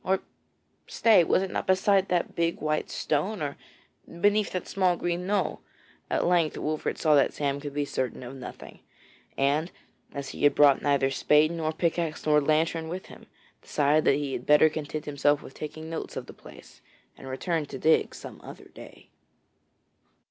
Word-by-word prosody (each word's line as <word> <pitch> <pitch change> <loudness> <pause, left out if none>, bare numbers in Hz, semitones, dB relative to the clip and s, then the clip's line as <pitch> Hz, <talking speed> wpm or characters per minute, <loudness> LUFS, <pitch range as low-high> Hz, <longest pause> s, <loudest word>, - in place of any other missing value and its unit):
Or 190 0 +1 0.7
stay, 215 -6 +4
was 185 - +2
it 190 - -4
not - - -3
beside 190 +1 +3
that 175 -1 -1
big 170 0 -1
white 155 0 -1
stone, 185 +8 -1
or 145 -2 -3 0.6
beneath 205 +2 +3
that 185 - -3
small 185 -3 +1
green 175 +1 -2
knoll? 195 -4 -1 0.5
At - - 0
length 170 -3 +2
Wolfert 155 0 -2
saw 155 -2 +3
that 140 -2 +4
Sam 140 -1 -1
could 145 -1 -7
be 145 0 0
certain 130 -2 -3
of 125 +2 -8
nothing, 130 - -10 0.6
and 145 +5 +1 0.4
as 140 -1 -6
he - - -8
had 145 -1 +5
brought 145 -2 +5
neither 140 -2 +2
spade 150 +3 +3
nor 160 -2 -2
pickaxe 165 -1 -2
nor 150 -1 +4
lantern 160 +2 +1
with 180 +3 -6
him, - - -14 0.3
decided 150 +1 +1
that - - +5
he 140 -2 -3
had 125 - -5
better 150 +1 +6
content 155 0 -5
himself 145 0 +1
with - - -11
taking 155 +1 -7
notes 165 0 -6
of - - -5
the - - -12
place, - - -15 0.3
and 135 - -12
return 150 +4 -2
to 135 - -7
dig 160 +4 +2
some - - -10
other - - -12
day. - - -14
155 Hz, 175 wpm, -27 LUFS, 145-175 Hz, 0.7 s, better